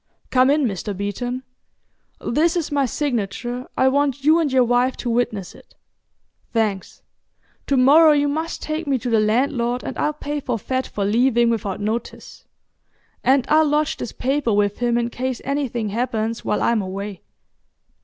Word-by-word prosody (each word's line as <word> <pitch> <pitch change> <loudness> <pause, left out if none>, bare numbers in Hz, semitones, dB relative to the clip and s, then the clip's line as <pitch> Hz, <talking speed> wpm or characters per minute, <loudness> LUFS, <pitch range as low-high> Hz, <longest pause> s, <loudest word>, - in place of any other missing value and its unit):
Come 255 0 +4
in, 295 +1 +3
Mr. 200 -2 -3
Beeton. 245 +6 -3 0.8
This 320 +7 +1
is 335 -4 -2
my 280 -2 +1
signature; 245 -1 -3
I 260 - +4
want 275 0 +1
you 310 +3 +5
and 310 -4 0
your 260 -1 +4
wife 245 +2 +1
to 240 - -3
witness 220 -5 -1
it. - - -19 0.8
Thanks. 215 -5 -2 0.6
To 275 - +2
morrow 300 +5 +7
you 290 -1 +3
must 315 +3 -3
take 310 +1 -3
me 275 -2 +2
to 245 0 -4
the 225 - +4
landlord 240 +2 +1
and - - -5
I'll 300 - +1
pay 295 0 -4
forfeit 260 0 -2
for 200 - -3
leaving 235 +2 +3
without 205 -4 -2
notice, 215 +3 -5 0.8
and 265 -1 +3
I'll 310 0 +4
lodge 300 +1 +1
this - - -5
paper 270 -2 -1
with 205 0 +1
him 240 -1 +1
in 240 0 -1
case 255 0 -3
anything 260 -6 -2
happens 225 0 -2
while - - 0
I'm 230 -2 +2
away. 195 0 -6
245 Hz, 165 wpm, -21 LUFS, 225-280 Hz, 0.8 s, morrow